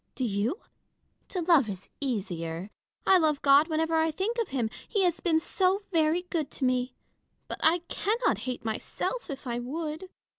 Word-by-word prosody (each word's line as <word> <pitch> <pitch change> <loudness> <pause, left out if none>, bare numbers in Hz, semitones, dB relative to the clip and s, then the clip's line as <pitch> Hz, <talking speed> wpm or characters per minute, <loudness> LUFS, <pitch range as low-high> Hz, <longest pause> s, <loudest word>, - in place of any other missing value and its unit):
Do 260 - -2
you? 225 - 0 0.7
To 365 - -3
love 320 -9 +4
is 190 -1 -7
easier. 185 - -3 0.3
I 380 -1 +6
love 305 -3 +2
God 280 +2 +6
whenever 320 0 0
I 320 0 +3
think 395 +9 -2
of 460 - 0
him, 240 -5 -1 0.2
he 405 -4 +1
has 350 -2 +2
been 325 -3 +2
so 380 +4 +1
very 325 +1 +2
good 335 -5 -2
to 265 - -1
me; 250 0 0 0.5
but - - -6
I 335 +2 +3
cannot 450 +5 0
hate 250 -2 -5
myself, 285 - -3
if 275 -1 -6
I 240 -1 -2
would. 310 +7 -4
310 Hz, 175 wpm, -28 LUFS, 250-355 Hz, 0.7 s, I